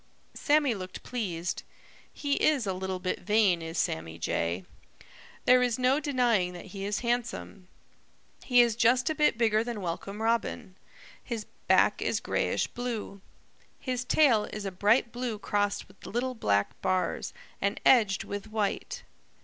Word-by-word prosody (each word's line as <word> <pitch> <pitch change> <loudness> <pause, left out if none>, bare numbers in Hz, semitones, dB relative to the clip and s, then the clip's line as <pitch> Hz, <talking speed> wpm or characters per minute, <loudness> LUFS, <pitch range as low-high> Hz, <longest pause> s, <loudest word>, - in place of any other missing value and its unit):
Sammy 290 -3 +2
looked 185 -3 -7
pleased. 180 -9 -3 0.5
He 285 -1 -2
is 290 -7 +3
a 190 - -1
little 190 0 -3
bit 185 0 -2
vain, 205 -5 +3
is 165 +1 -6
Sammy 80 - -2
Jay. 85 +2 -2 0.8
There 250 0 +6
is 245 -2 +1
no 255 +3 +3
denying 240 -11 +1
that 175 - -9
he 195 -1 -5
is 205 +1 -2
handsome. 235 -5 -3 0.8
He 245 -2 +5
is 235 -2 +2
just 245 +5 +3
a - - +1
bit 300 -6 +2
bigger 220 -2 +3
than 235 -2 -4
Welcome 195 +3 -5
Robin. 225 -2 -1 0.5
His 230 -4 -4 0.2
back - - +4
is - - 0
grayish - - 0
blue. 230 -5 -5 0.6
His 255 -2 -2
tail 250 -5 +4
is 210 -1 -6
a 195 - -2
bright 210 +6 +2
blue 240 -3 -3
crossed 205 -1 -1
with 190 - -21
little 250 +4 -2
black 100 - 0
bars 185 -1 -1 0.3
and 200 +2 0
edged 210 -7 +5
with 205 +1 -6
white. 220 - -2
220 Hz, 150 wpm, -29 LUFS, 190-245 Hz, 0.8 s, There